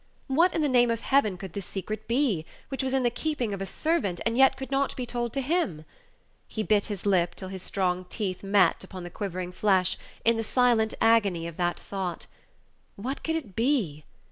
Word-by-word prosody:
What, 330 +7 +3
in 320 - +1
the - - +3
name 245 -3 +4
of 230 -1 -1
Heaven, 230 -10 +2
could 185 -2 -8
this 200 -3 -5
secret 215 +2 -5
be, 235 - +1 0.3
which 270 - -2
was 265 -1 -1
in 265 -1 +2
the 240 - +2
keeping 250 -6 -2
of 195 - -5
a 195 - -3
servant, 210 - 0
and 230 0 +1
yet 265 +1 +5
could 270 0 -7
not 275 0 +1
be 250 - -3
told 240 -1 -2
to 275 - 0
him? 260 - -1 0.6
He 220 - -3
bit 210 -1 +2
his 205 -3 -5
lip 180 -4 +2
till 190 - -7
his 190 -1 -6
strong 185 -1 -1
teeth 185 -1 -3
met 195 -3 +3
upon 185 -1 -8
the 175 - -7
quivering 185 -3 -4
flesh, 185 -1 +2 0.3
in 230 0 +4
the 225 - -1
silent 230 -2 +2
agony 205 -7 +3
of 170 -1 -7
that 175 -1 0
thought. 190 -3 -4 0.7
What 255 +7 -5
could 320 - 0
it 240 - -5
be? 225 - +1
215 Hz, 210 wpm, -27 LUFS, 185-255 Hz, 0.7 s, yet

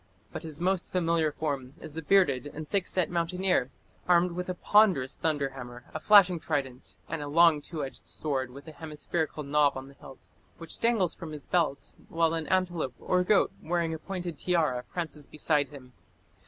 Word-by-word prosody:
But - - -5
his 160 -3 -5
most 185 +1 0
familiar 165 -3 +1
form 140 -3 -4
is 155 -2 -7
the 160 - -4
bearded 150 -6 +3
and 150 +1 -8
thick 195 +1 0
set 185 -2 +1
mountaineer, 175 -4 +1 0.4
armed 180 0 +4
with 180 +1 -4
a 185 - -2
ponderous 180 -11 +3
thunder 145 -4 0
hammer, 125 -2 -9
a 155 - -3
flashing 185 -1 +6
trident, 135 -5 -3
and 165 - -4
a 145 - -4
long 160 0 +5
two 150 -1 -5
edged 135 - -9
sword 135 -4 -2
with 140 +5 -12
a - - -7
hemispherical 155 0 -4
knob 145 0 +2
on 135 +1 -8
the - - -15
hilt, 135 -1 -14 0.3
which 165 -1 -6
dangles 225 -7 +2
from 160 -2 -8
his 150 -2 -8
belt, 160 -6 0 0.2
while 165 0 +2
an 160 -2 -2
antelope 175 -8 0
or 180 0 +1
goat 200 +2 +3
wearing 170 -1 -1
a 160 - -5
pointed 175 -3 -5
tiara 155 -9 +1
prances 160 -4 -4
beside 150 -2 +1
him. 130 -3 -13
160 Hz, 185 wpm, -29 LUFS, 145-175 Hz, 0.4 s, flashing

